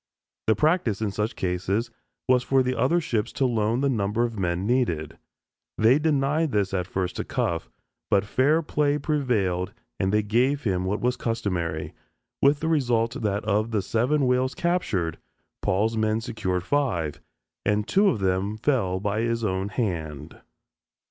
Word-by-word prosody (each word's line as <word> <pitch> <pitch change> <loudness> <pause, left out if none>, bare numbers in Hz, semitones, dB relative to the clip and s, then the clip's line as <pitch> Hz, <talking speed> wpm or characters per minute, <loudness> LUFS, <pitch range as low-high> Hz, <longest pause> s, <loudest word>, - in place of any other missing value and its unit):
The 110 - +4
practice 150 - +1
in 110 -2 -1
such 105 +3 -2
cases 95 +6 -1 0.4
was 125 -1 +4
for 130 +1 +2
the 130 0 -1
other 165 +9 +2
ships 115 -8 -1
to 135 - +1
loan 115 0 +1
the 140 - +2
number 110 -1 0
of 115 -3 -2
men 90 0 -1
needed. 105 - 0 0.6
They 120 +6 +5
denied 150 0 +1
this 100 -3 0
at 90 -2 -1
first 95 -2 -3
to - - -1
Cuffe, 85 -1 -2 0.4
but 100 0 +3
fair 145 +9 +2
play 145 -1 +1
prevailed 120 - 0 0.3
and 95 - +1
they 105 0 +2
gave 125 +7 +1
him 95 -4 0
what 100 +3 -1
was 125 +1 +1
customary, 90 -9 -2 0.5
with 140 +1 +4
the 160 - -1
result 120 -7 +1
that 105 -2 -1
of 110 +1 +1
the 105 -4 0
seven 130 +8 +1
whales 125 +1 +1
captured, 110 - -1 0.4
Paul's 110 +4 +1
men 110 0 +1
secured 100 -6 -2
five, 95 - -1 0.4
and 105 +1 +1
two 200 +2 +4
of 155 - +2
them 95 +3 0
fell 110 -7 +1
by 105 +2 -1
his 115 0 -1
own 95 0 -1
hand! 80 - -4
110 Hz, 160 wpm, -25 LUFS, 95-130 Hz, 0.6 s, They